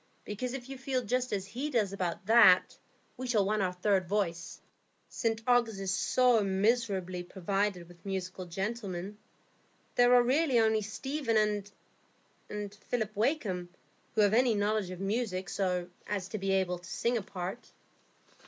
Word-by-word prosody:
Because 245 +5 -4
if 255 -2 -7
you 270 -1 -8
feel 260 -1 -1
just 250 +3 -1
as 195 -2 -1
he 250 +9 -4
does 215 -8 +1
about 185 -2 -3
that, 220 -4 +6 0.4
we 255 - -4
shall 215 -5 +2
want 210 +1 +1
our 185 -1 +1
third 185 0 +1
voice. 170 -5 -2 0.5
St 225 0 -1
Ogg's 235 -4 +2
is 195 -1 -1
so 250 +1 +3
miserably 195 -2 0
provided 190 0 -2
with 175 -1 -17
musical 185 -1 -4
gentlemen. 195 +1 -4 0.7
There 245 0 +5
are 245 - +6
really 270 +1 +2
only 220 -1 +3
Stephen 215 -3 0 0.9
and 210 -1 -5
Philip 215 0 -3
Wakem 210 - 0 0.5
who 220 - +4
have 205 0 +4
any 240 -1 +4
knowledge 205 -1 0
of 185 -1 -7
music, 195 -2 -2
so 180 -2 -1 0.2
as 195 -3 -2
to 215 - -4
be 195 0 -1
able 180 -2 +1
to 180 +1 -13
sing 235 +1 0
a 230 - 0
part." 190 +4 -6
210 Hz, 155 wpm, -31 LUFS, 190-235 Hz, 0.9 s, that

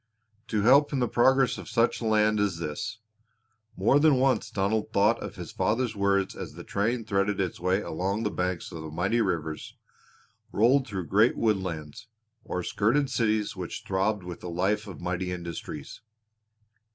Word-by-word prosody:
To 105 -2 0
help 140 +5 +5
in 140 - -1
the 125 -2 +1
progress 130 +2 +3
of - - -9
such 115 0 +1
a - - -3
land 110 -1 +3
as 100 -4 0
this! 85 +7 -4 0.8
More 110 +9 +4
than 155 -1 +5
once 130 0 +2
Donald 105 +2 -1
thought 105 +3 +3
of - - -6
his - - -8
father's 115 -1 0
words 100 -1 +1
as - - -7
the - - -9
train 115 +3 -1
threaded 100 -2 0
its 95 -3 -2
way 90 +3 +1
along 95 +6 -2
the 105 - -1
banks 90 -1 -2
of 80 -3 -7
mighty 95 +9 +1
rivers, 80 -6 -3 0.7
rolled 130 +5 +3
through 95 -5 -4
great 105 +8 +3
woodlands, 95 -3 -2 0.4
or 90 - -3
skirted 130 +10 +1
cities 110 -4 0
which 90 -3 -6
throbbed 100 +1 0
with 90 -1 -7
the 90 - -7
life 100 +5 0
of 95 -6 -9
mighty 90 +1 -2
industries. 85 -2 -7
100 Hz, 165 wpm, -27 LUFS, 90-115 Hz, 0.8 s, help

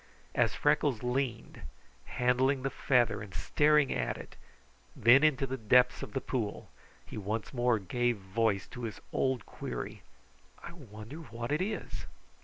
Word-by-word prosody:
As - - +2
Freckles 125 -6 +2
leaned, 125 -1 -2 0.4
handling 130 - +1
the 135 - -1
feather 120 -6 +2
and 100 -3 -9
staring 150 -2 +3
at - - -1
it, - - -11 0.6
then 125 +6 +6
into 145 -3 +3
the 130 0 -4
depths 125 +3 +4
of - - -7
the 135 - 0
pool, 110 -6 -3 0.3
he - - -7
once 105 +5 -3
more 120 -2 +2
gave 120 +5 0
voice 100 +1 0
to 120 -1 -6
his 110 -4 -6
old 130 -4 0
query: 60 - -6 0.6
"I - - -8
wonder 115 -3 -10
what 120 -5 -6
it 150 - +1
is!" 215 +3 -4
125 Hz, 150 wpm, -31 LUFS, 110-135 Hz, 0.6 s, then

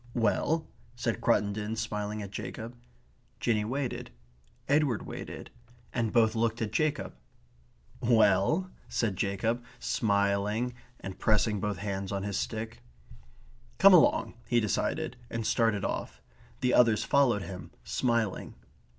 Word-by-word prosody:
"Well?" 135 +8 +1 0.3
said - - -2
Cruttendon, 105 +1 +1
smiling 105 -1 -3
at 100 - -8
Jacob. 115 +3 -6 0.6
Jinny 110 -3 +1
waited; 130 +3 -3 0.6
Edward 140 -5 +2
waited; - - -7 0.4
and 115 -3 0
both 110 -2 +4
looked 115 0 0
at 110 -2 -2
Jacob. 155 -2 0 0.9
"Well?" 115 - +3 0.2
said 110 -5 0
Jacob, 110 +6 -1
smiling 100 +3 +1 0.3
and 95 -1 -7
pressing 105 -1 +2
both 105 0 -2
hands 100 -1 -3
on 100 -1 -2
his 100 -1 -2
stick. 110 0 -4 1.0
"Come 195 0 +8
along," 175 - +5
he 120 - +3
decided; 110 +3 -1
and 115 -1 -3
started 110 -4 +2
off. - - -4 0.4
The 125 -1 +2
others 115 -3 +5
followed 125 -8 +3
him, 95 -2 -8
smiling. 115 -5 -1
110 Hz, 120 wpm, -29 LUFS, 100-120 Hz, 1.0 s, Come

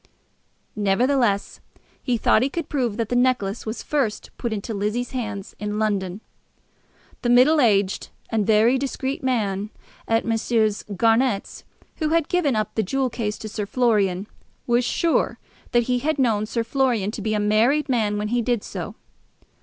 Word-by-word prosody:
Nevertheless 210 +1 +1 0.4
he 245 -3 0
thought 215 - +3
he 260 - +1
could 330 +1 -4
prove 245 -7 -1
that 230 -2 -2
the 245 - 0
necklace 245 -5 +1
was 220 - -4
first 250 -8 -1
put 235 - -3
into 215 +1 -4
Lizzie's 215 +4 -2
hands 215 -6 -5
in 210 0 -3
London. 200 -2 -1 1.0
The 240 - 0
middle 265 +6 +6
aged 200 -5 +2 0.2
and 215 -3 0
very 225 +4 +4
discreet 270 0 -3
man 210 -6 -1 0.4
at 225 0 +1
Messrs. 225 -2 +1
Garnett's, 225 0 +1 0.3
who 310 -2 0
had 330 -1 +1
given 315 -8 +1
up 215 -1 -1
the 220 - +1
jewel 255 +5 -1
case 215 -3 -3
to 220 - -7
Sir 210 -1 -4
Florian, 205 -6 +1 0.4
was 240 +1 +2
sure 330 +7 +1 0.3
that 240 0 +3
he 250 +1 0
had 300 +4 -1
known 220 -5 +1
Sir 230 +1 -1
Florian 235 -5 0
to 220 - -6
be 215 +1 -1
a - - +1
married 225 +8 +2
man 220 -6 +1
when 210 0 -2
he 240 +1 +1
did 235 -2 0
so. - - -6
230 Hz, 165 wpm, -23 LUFS, 210-255 Hz, 1.0 s, middle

